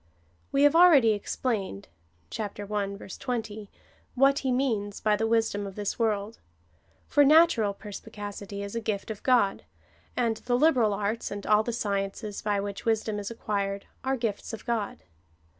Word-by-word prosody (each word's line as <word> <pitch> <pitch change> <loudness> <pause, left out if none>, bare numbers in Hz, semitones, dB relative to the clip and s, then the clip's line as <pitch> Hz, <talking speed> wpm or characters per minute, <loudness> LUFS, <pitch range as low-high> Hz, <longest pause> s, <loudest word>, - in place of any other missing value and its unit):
We 275 - +3
have 290 +2 +5
already 320 -10 +7
explained 205 - -3 0.4
(chap. 205 -2 -5
i. 205 - -4 0.2
20) 215 +1 -5 0.5
what 275 +2 +4
he 265 - -1
means 225 -6 -1
by 210 0 +2
the 225 +1 0
wisdom 225 -3 +1
of 195 - -9
this 205 +1 -3
world; 215 -1 -1 0.7
for 290 - +5
natural 280 -9 +5
perspi 210 +2 -9
cacity 205 -1 -6
is 200 +2 -6
a 230 - -1
gift 215 -1 -3
of 210 - -7
God, 240 -7 +2 0.5
and 230 -2 +1
the 245 +1 0
liberal 250 -8 +3
arts, 210 +3 -2
and 200 0 -6
all 210 0 +5
the 240 - -3
sciences 200 -1 -3
by 205 -1 0
which 200 0 -5
wisdom 220 -2 0
is 200 - -5
acquired, 200 -3 -3 0.2
are 265 0 0
gifts 225 -2 -3
of 225 - -7
God. 225 - -2
215 Hz, 160 wpm, -27 LUFS, 200-240 Hz, 0.7 s, already